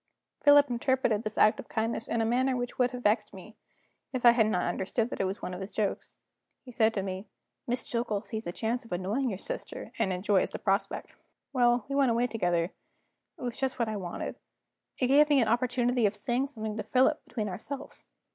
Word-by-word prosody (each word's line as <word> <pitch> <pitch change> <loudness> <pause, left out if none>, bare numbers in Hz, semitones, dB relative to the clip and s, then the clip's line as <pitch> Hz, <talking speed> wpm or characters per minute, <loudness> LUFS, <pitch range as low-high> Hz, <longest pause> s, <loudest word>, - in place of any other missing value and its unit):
Philip 290 -1 +7
interpreted 240 -3 +1
this 215 -1 -5
act 215 +1 +5
of - - -8
kindness 225 +1 -2
in 230 - 0
a - - +1
manner 255 +3 +2
which 245 +1 -4
would 250 -1 +4
have 250 -1 -7
vexed 210 -1 +1
me, 215 +4 -12 0.6
if 250 -1 -2
I 240 - +10
had 230 -2 +3
not 195 -4 +1
understood 195 +6 -1
that - - -2
it - - +1
was 190 +2 -4
one 180 - -4
of 180 - -6
his 190 - -5
jokes. 210 -2 -3 0.5
He 250 - -10
said 225 -2 +3
to 195 - -1
me: 190 +1 -5 0.4
"Miss 245 0 -2
Jillgall 230 -4 -1
sees 220 -2 -5
a - - -2
chance 230 +6 -2
of 230 - -17
annoying 200 +9 -1
your 195 - -3
sister, - - -6
and 190 - +1
enjoys 185 +1 +1
the - - -5
prospect." 195 0 -1 0.4
Well, 240 -2 +3
away 275 -1 +2
we - - +3
went 240 0 +1
together; 175 -5 0 0.7
it - - -15
was 240 -2 -4
just 265 -1 -1
what 235 -3 0
I 215 - -2
wanted; 180 -4 -5 0.6
it 255 - +1
gave 290 +4 +5
me 290 -2 +5
an 230 - +3
opportunity 245 0 +2
of 200 - -3
saying 240 +6 -1
something 220 -5 -5
to 215 - -2
Philip, 260 +4 +2
between 215 -3 -3
ourselves. 260 +9 -7
230 Hz, 215 wpm, -29 LUFS, 205-250 Hz, 0.7 s, I